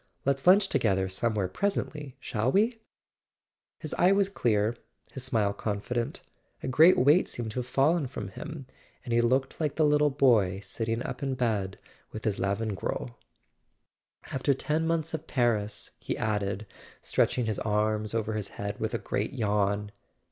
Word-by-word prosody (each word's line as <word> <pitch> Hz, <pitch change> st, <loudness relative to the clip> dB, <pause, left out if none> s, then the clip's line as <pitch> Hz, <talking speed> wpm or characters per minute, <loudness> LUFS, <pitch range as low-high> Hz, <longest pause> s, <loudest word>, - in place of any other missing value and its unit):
Let's 135 Hz, +3 st, 0 dB
lunch 195 Hz, +2 st, +7 dB
together 100 Hz, -, +1 dB
somewhere 100 Hz, +1 st, 0 dB
presently, 150 Hz, -, -3 dB
shall 115 Hz, +4 st, -1 dB
we: 220 Hz, -, +2 dB, 1.0 s
His 155 Hz, -, -5 dB
eye 180 Hz, -, +6 dB
was 195 Hz, 0 st, +3 dB
clear, 110 Hz, -, +1 dB, 0.4 s
his 135 Hz, -, -5 dB
smile 110 Hz, -6 st, +1 dB
confident: 115 Hz, +4 st, -3 dB, 0.4 s
a -, -, -3 dB
great 155 Hz, +8 st, +6 dB
weight 145 Hz, +8 st, +5 dB
seemed 115 Hz, -2 st, -3 dB
to 125 Hz, -, -3 dB
have 125 Hz, -, -4 dB
fallen 140 Hz, +3 st, +2 dB
from 105 Hz, -6 st, -6 dB
him, 145 Hz, +8 st, -8 dB, 0.4 s
and 120 Hz, -, -3 dB
he 120 Hz, -, +4 dB
looked 130 Hz, +5 st, 0 dB
like 150 Hz, -3 st, 0 dB
the 155 Hz, -, +3 dB
little 150 Hz, 0 st, +4 dB
boy 115 Hz, -9 st, +3 dB
sitting 115 Hz, +4 st, -3 dB
up -, -, -5 dB
in 135 Hz, -1 st, -1 dB
bed 110 Hz, -6 st, -1 dB, 0.3 s
with 110 Hz, -, -7 dB
his 105 Hz, -3 st, 0 dB
Lavengro. 100 Hz, -, -2 dB, 1.2 s
"After 135 Hz, +1 st, +1 dB
ten 155 Hz, +4 st, -1 dB
months 165 Hz, -1 st, -1 dB
of 160 Hz, -, -4 dB
Paris 115 Hz, -5 st, 0 dB
" -, -, -41 dB
he -, -, -3 dB
added, 105 Hz, -1 st, -1 dB, 0.4 s
stretching 125 Hz, -, +1 dB
his 110 Hz, -2 st, -1 dB
arms 105 Hz, 0 st, 0 dB
over 110 Hz, -1 st, -1 dB
his 105 Hz, -2 st, -2 dB
head 100 Hz, 0 st, -5 dB
with -, -, -2 dB
a -, -, +2 dB
great -, -, -2 dB
yawn. 105 Hz, -1 st, 0 dB
120 Hz, 160 wpm, -28 LUFS, 105-145 Hz, 1.2 s, lunch